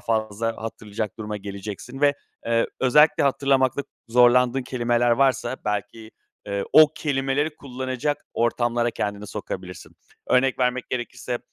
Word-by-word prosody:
fazla 115 -1 -1
hatırlayacak 105 -1 -5
duruma 105 -1 -4
geleceksin 100 +6 -7
ve, 145 -1 +4 0.3
eee, 115 0 +2
özellikle 150 +5 +5
hatırlamakta 135 -1 +2 0.3
zorlandığın 125 +2 +4
kelimeler 120 -1 +1
varsa, 130 +1 +2
belki, 110 +2 -4 0.4
eee, 100 -1 -2
o 155 -1 +8
kelimeleri 145 +1 -1
kullanacak 130 +2 -4
ortamlara 120 0 +1
kendini 105 -1 -4
sokabilirsin. - - -7 0.3
Örnek 130 +1 +3
vermek 125 0 0
gerekirse, 120 0 -4
120 Hz, 115 wpm, -24 LUFS, 110-135 Hz, 0.4 s, o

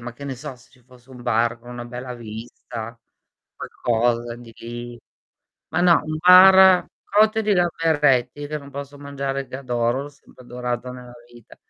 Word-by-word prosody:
ma 120 0 -7
che 140 +4 -11
ne 135 -2 -4
so, 135 0 -8
se 125 - -23
ci 125 -2 -25
fosse 125 +1 -21
un 125 -1 -12
bar 115 0 0
con 120 +1 -14
una 120 0 -7
bella 125 +1 -7
vista, 115 0 -9 0.6
qualcosa 120 0 -1
di 120 0 -9 0.7
ma 175 - -1
no 175 -2 +5
un 155 0 -4
bar 185 +1 +8 0.2
cotte 215 +2 +3
di 210 -1 +1
gamberetti 145 -6 +1
che 150 +1 -4
non 140 0 -13
posso 140 +1 -8
mangiare 140 -1 -4
che 130 - -6
adoro, 120 0 -1
l'ho 145 - -8
sempre 140 -2 -19
adorato 125 0 -4
nella 125 -1 -11 0.2
vita. 120 -2 -17
125 Hz, 170 wpm, -22 LUFS, 120-145 Hz, 0.7 s, bar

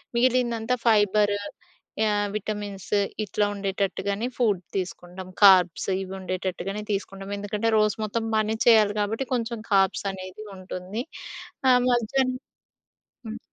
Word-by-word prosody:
మిగిలిందంతా 240 -1 +2
ఫైబర్, 205 -2 +4 0.7
ఆహ్, 205 0 +1
విటమిన్స్ 205 -2 -5 0.3
ఇట్లా 205 +1 0
ఉండేటట్టుగానే 200 +2 -2
ఫుడ్ 210 -7 +2 0.2
తీసుకుంటాం. 185 0 -6
కార్బ్స్ 185 -3 +6 0.2
ఇవి 190 0 -8
ఉండేటట్టుగానే 190 +2 -4
తీసుకుంటాం 195 0 -4
ఎందుకంటే 210 +2 -1
రోజు 215 -1 +2
మొత్తం 225 +2 -2
పని 215 +1 +1
చేయాలి 215 -3 +6
కాబట్టి 220 +6 -1
కొంచెం 235 -1 -1
కార్బ్స్ 195 0 +3
అనేది 185 +3 -9
ఉంటుంది. 185 +5 -5 0.7
ఆహ్, 250 -1 +6
మధ్యాహ్నం 255 +2 +1 0.9
హ్మ్. 225 +1 -6
205 Hz, 110 wpm, -25 LUFS, 195-225 Hz, 0.9 s, కార్బ్స్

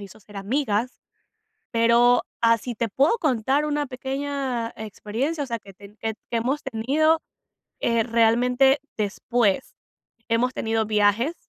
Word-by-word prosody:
hizo 200 +1 -12
ser 205 0 -14
amigas. 225 +2 -1 0.7
Pero 235 +1 +4 0.2
así 230 +1 +2
te 230 +1 -1
puedo 280 - +2
contar 270 - +1
una 295 -1 -1
pequeña 265 -2 -3
experiencia, 225 +8 -3
o 275 - -7
sea, 235 - -2
que 195 -2 -15
ten 200 +2 -15
que 220 -1 -3 0.2
hemos 250 +6 0
tenido, 285 +7 +2 0.6
eh, 230 -1 +2
realmente 245 +4 +3 0.2
después. 215 +2 0 0.5
Hemos 235 +2 +1
tenido 225 0 0
viajes, 210 +7 +2
235 Hz, 125 wpm, -24 LUFS, 220-270 Hz, 0.7 s, Pero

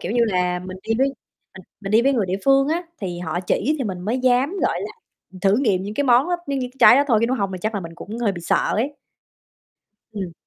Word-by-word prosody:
kiểu - - -4
như 240 - +1
là, 180 -4 0
mình 185 +1 -8
đi 225 - -2
với 270 - +4 0.5
mình 185 - -11 0.2
mình 195 -1 -5
đi 225 - +5
với 275 +2 +3
người 220 -7 0
địa 185 +1 -1
phương 275 0 +4
á, 335 +3 0 0.2
thì 180 -4 -4
họ 175 0 -3
chỉ 230 +10 0
thì 260 - -2
mình 185 -4 -4
mới 220 +8 -2
dám, 255 +2 +2
gọi - - 0
là, - - -5 0.4
mình 185 - -13
thử 195 +2 +3
nghiệm 210 -9 +1
những 205 +2 -6
cái 285 - 0
món 255 +5 +4
đó, 355 - +1
nh - - -6
những 275 -1 -1
cái 265 - -28
trái - - +8
đó 285 - +4
thôi, 225 -4 +4
chứ 230 - +2
nếu 255 +2 0
hông 200 -4 -2
thì 185 - -5
chắc 215 +3 -2
là 200 - -2
mình 165 -2 -9
cũng 210 +6 -8
hơi 225 -4 0
bị 175 - -7
sợ 170 - +1 0.2
ấy. 265 +7 -1 1.2
Ừm. 190 -5 -5
215 Hz, 280 wpm, -21 LUFS, 185-260 Hz, 1.2 s, trái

